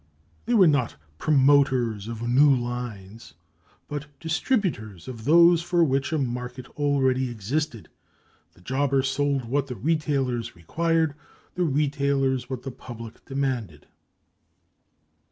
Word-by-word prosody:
They 240 - +2
were 195 -4 +7
not 145 -7 +2 0.2
promoters 130 -7 +3
of 115 0 -5
new 135 +5 +5
lines, 115 - -6 0.5
but 150 0 -5
distributors 160 - -2
of 115 -4 -8
those 170 +2 +6
for 170 0 +2
which 135 -2 0
a 160 - +1
market 125 -1 -4
already 130 -3 +1
existed. 120 +3 -3 0.7
The - - -20
jobber 135 +5 0
sold 140 -1 0
what 140 +4 -1
the 125 - -5
retailers 135 - -1
required; 160 - 0 0.4
the 180 - 0
retailers 140 -3 0
what 130 -2 -5
the 135 - -5
public 115 -2 -10
demanded. 125 - -3
135 Hz, 120 wpm, -25 LUFS, 120-145 Hz, 0.7 s, were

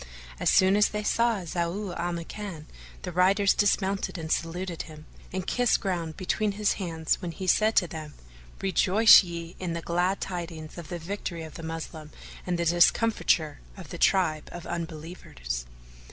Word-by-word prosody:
As - - +2
soon 190 +1 +5
as 210 0 +4
they 210 0 -3
saw 230 -1 +1
Zau 175 +3 -3
al 175 +1 -2
Makan, 170 -1 -6 0.4
the 180 - -4
riders 195 +3 +4
dismounted 195 -2 +1
and 160 -1 -5
saluted 170 +1 -2
him, 155 -1 -11 0.3
and 185 0 -3
kissed 245 -1 +2
ground 170 -5 -3
between 205 +3 0
his 210 0 +1
hands 165 -3 -1
when 175 - -4
he 190 +3 -6
said 215 +4 +3
to 175 - +4
them, 155 -3 -8 0.5
"Rejoice 195 +3 +7
ye 170 -1 -7
in 180 -2 -3
the 170 - -3
glad 180 +3 0
tidings 170 -4 -6
of 165 - -9
the 175 - -4
victory 170 -1 -5
of 160 - -9
the - - -8
Moslem 160 -1 -6 0.4
and 175 -1 0
the 170 - -1
discomfiture 175 -2 +3 0.2
of - - -10
the - - -7
tribe 160 -6 +2
of 175 - -8
Unbelievers!" 155 - -5
175 Hz, 165 wpm, -27 LUFS, 165-195 Hz, 0.5 s, Rejoice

